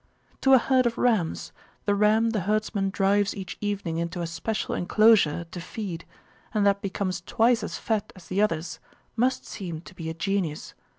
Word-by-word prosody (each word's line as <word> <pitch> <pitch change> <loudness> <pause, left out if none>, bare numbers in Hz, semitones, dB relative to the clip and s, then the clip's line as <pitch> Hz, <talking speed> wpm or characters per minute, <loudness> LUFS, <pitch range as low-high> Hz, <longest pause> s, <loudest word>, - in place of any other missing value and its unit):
To 270 - +5
a - - +8
herd 255 0 +3
of 230 - -3
rams, 215 -10 +1 0.3
the 205 - +2
ram 215 +2 +3
the 220 - 0
herdsman 205 0 0
drives 200 +1 +2
each 190 -2 -6
evening 200 -5 -2
into 170 +1 -3
a - - -1
special 170 +7 -3
enclosure 200 -4 +4
to 180 - -6
feed 175 -3 -6 0.5
and 210 -1 +3
that 200 0 +3
becomes 190 -1 -2
twice 230 +1 +2
as - - -4
fat 220 -3 -2
as 185 -3 -14
the 190 +4 0
others 165 -5 -1 0.4
must 250 +3 +1
seem 170 -6 -6
to 185 - -13
be 165 -3 -6
a 160 - -5
genius. 175 -3 -2
200 Hz, 180 wpm, -26 LUFS, 175-215 Hz, 0.5 s, a